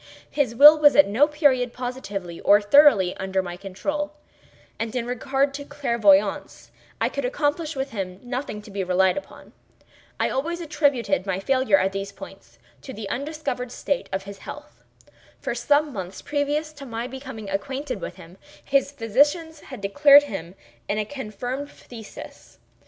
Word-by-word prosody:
His 260 -6 0
will 300 +4 +9
was 290 -1 +6
at 290 - +7
no 235 +9 +3
period 275 -5 +2
positively, 205 -9 -6
or 205 +1 +5
thoroughly, 205 -4 +5
under 190 0 -1
my 175 -1 -6
control, 290 +11 -4 0.7
and 225 +1 -4
in 240 -2 -1
regard 270 +3 -1
to 285 0 -6
clairvoyance, 235 -9 +1 0.3
I - - +2
could - - -4
accomplish 320 -10 -1
with 270 0 -3
him 190 -3 -5
nothing 245 -4 -5
to 210 - -13
be 195 -1 -2
relied 185 0 +2
upon. 290 - -9 0.7
I - - +2
always 335 +6 -2
attributed 265 - 0
my 190 -1 -1
failure 255 -1 +2
at 190 0 +1
these 195 0 -5
points - - -13 0.2
to 265 - -9
the 210 -1 -6 0.2
disordered 285 -5 -4
state 285 +1 -3
of 190 0 -2
his 200 0 -10
health. - - -11 0.6
For - - -3
some 295 0 +1
months 185 -2 -7
previous 295 +1 -1
to 285 -2 -10
my 230 0 -4
becoming 260 -4 -8
acquainted 255 +3 -4
with - - -6
him, 175 +3 -15 0.3
his 275 0 +1
physicians 290 - +1
had 260 -7 -10
declared 285 +8 +6
him 185 - -7 0.3
in 205 - -1
a 215 - -1
confirmed 255 +2 -5
phthisis. 230 -6 -12
250 Hz, 160 wpm, -24 LUFS, 200-290 Hz, 0.7 s, will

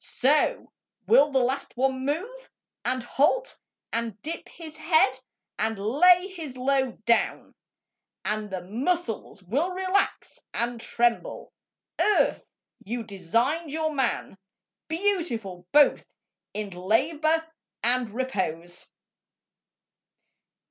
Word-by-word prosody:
So 300 - +2 0.3
will 265 +9 +5
the 270 - +2
last 265 0 -2
one 260 0 +1
move, 400 - -3 0.3
And 255 0 0
halt, 310 - +1 0.3
and 230 -3 -2
dip 330 +2 -5
his 315 -2 -11
head, 315 -5 +3 0.4
and 220 0 0
lay 350 - +5
his 315 -9 -8
load 260 -4 0
Down, 235 0 +1 0.7
and 210 0 -1
the 185 -2 -5
muscles 235 - -2
will 275 - 0
relax 375 +2 0 0.2
and 235 0 -1
tremble... 235 0 -1 0.5
Earth, 425 - +3 0.4
you 235 +3 -3
designed 230 - -1
your 315 +1 -1
man 255 -7 -1 0.5
Beautiful 315 - -1
both 295 -1 +5 0.5
in 210 -1 -5
labour, 295 - +1 0.4
and 245 0 +4
repose. 185 -8 -3
260 Hz, 100 wpm, -26 LUFS, 220-315 Hz, 0.7 s, will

